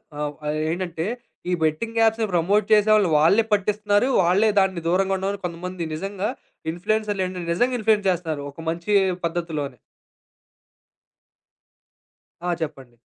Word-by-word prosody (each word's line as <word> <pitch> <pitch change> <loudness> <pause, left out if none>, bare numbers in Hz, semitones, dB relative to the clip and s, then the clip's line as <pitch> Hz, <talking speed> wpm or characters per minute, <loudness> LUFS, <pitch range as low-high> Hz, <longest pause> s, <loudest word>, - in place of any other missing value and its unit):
ఆహ్, 150 0 -3
ఆహ్, 150 +1 -1
ఏంటంటే 170 -2 -3 0.4
ఈ - - +1
బెట్టింగ్ 160 +10 -1
యాప్స్‌ని 225 0 +3
ప్రమోట్ 195 +5 +2
చేసేవాళ్ళు 210 -2 +5
వాళ్ళే 195 +9 +5
పట్టిస్తున్నారు. 210 +2 +2
వాళ్ళే 190 +5 +3
దాన్ని 190 -3 +1
దూరంగా 190 +2 +2
ఉండమని 195 +1 -3
కొంతమంది 175 0 -4
నిజంగా 195 +4 -3 0.4
ఇన్‌ఫ్లూయెన్సర్లేం‌టం‌టే 185 -1 -2
నిజంగా 245 +7 +1
ఇన్‌ఫ్లూయెన్స్ 215 -2 +2
జేస్తన్నారు. 160 -5 -2
ఒక 165 - -11
మంచి 170 +5 -2 0.3
పద్ధతిలోనే. 160 -6 -3 2.6
ఆ! 175 0 -1
చెప్పండి. 135 -6 -6
185 Hz, 115 wpm, -23 LUFS, 165-210 Hz, 2.6 s, చేసేవాళ్ళు